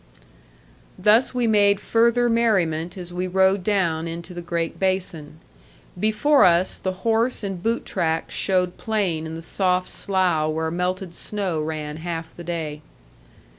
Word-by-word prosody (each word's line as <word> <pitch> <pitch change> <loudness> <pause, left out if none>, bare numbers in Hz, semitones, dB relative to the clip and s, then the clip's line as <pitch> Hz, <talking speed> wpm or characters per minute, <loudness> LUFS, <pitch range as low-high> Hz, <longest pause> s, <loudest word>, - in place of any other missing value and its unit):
Thus 215 +7 +4
we 245 -1 +1
made 205 -2 +4
further 235 +2 +2
merriment 190 -8 +1
as 175 -1 -7
we 180 +1 -2
rode 190 +1 +2
down 170 -5 0
into 170 +2 -7
the 175 - -6
great 170 -1 -3
basin. 180 -6 -1 0.6
Before 245 +9 +3
us, 175 +1 +4
the 185 +1 -5
horse 230 +1 +1
and 195 -3 -4
boot 230 +4 -1
tracks 160 0 -1
showed 185 -2 0
plain 190 -8 -1
in 160 - -6
the 165 - -7
soft 180 +1 0
slough 180 -5 0
where 160 0 -2
melted 180 +1 -2
snow 190 -5 -3
ran 155 -1 -4
half 165 0 -5
the 175 - -9
day. 160 -3 -4
180 Hz, 145 wpm, -23 LUFS, 165-205 Hz, 0.6 s, Thus